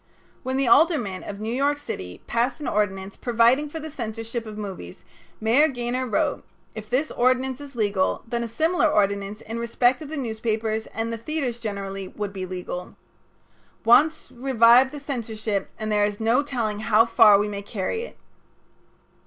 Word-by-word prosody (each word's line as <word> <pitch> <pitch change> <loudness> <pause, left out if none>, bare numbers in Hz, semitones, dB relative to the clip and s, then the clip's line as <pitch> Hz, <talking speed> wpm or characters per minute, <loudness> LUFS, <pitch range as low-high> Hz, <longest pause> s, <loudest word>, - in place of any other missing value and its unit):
When 260 0 -2
the 270 -2 +1
aldermen 240 - +3
of 200 -1 -7
New 220 +2 -3
York 285 +3 +1
City 90 - -7
passed 240 +4 0
an 295 - -5
ordinance 195 -2 -1
providing 240 +5 +2
for 320 - -6
the 315 0 -7
censorship 225 -2 -5
of 210 -1 -8
movies 190 - -7 0.4
Mayor 235 +8 +4
Gaynor 250 -1 -2
wrote: 215 - 0 0.3
"If 215 -1 -8
this 270 +6 0
ordinance 255 +2 +1
is 280 -2 -10
legal, 205 -4 0
then 235 0 -2
a - - -3
similar 320 +9 +2
ordinance 200 -4 0
in 225 +1 -6
respect 245 +3 +2
of 300 - -8
the 315 - -5
newspapers 220 -2 -2
and 225 +1 -4
the 230 - -5
theaters 255 -2 -3
generally 195 -3 -5
would 205 0 -5
be 185 -2 -5
legal. 180 0 -6 0.9
Once 310 +7 +4
revive 250 0 +5
the 295 - -7
censorship 220 -7 -3
and 215 0 -3
there 210 -1 +3
is 205 0 -1
no 230 +4 +3
telling 235 -7 -2
how 215 +1 +4
far 215 -3 +6
we 205 +1 0
may 200 -1 -5
carry 205 - -3
it." 485 - -9
230 Hz, 170 wpm, -24 LUFS, 210-260 Hz, 0.9 s, far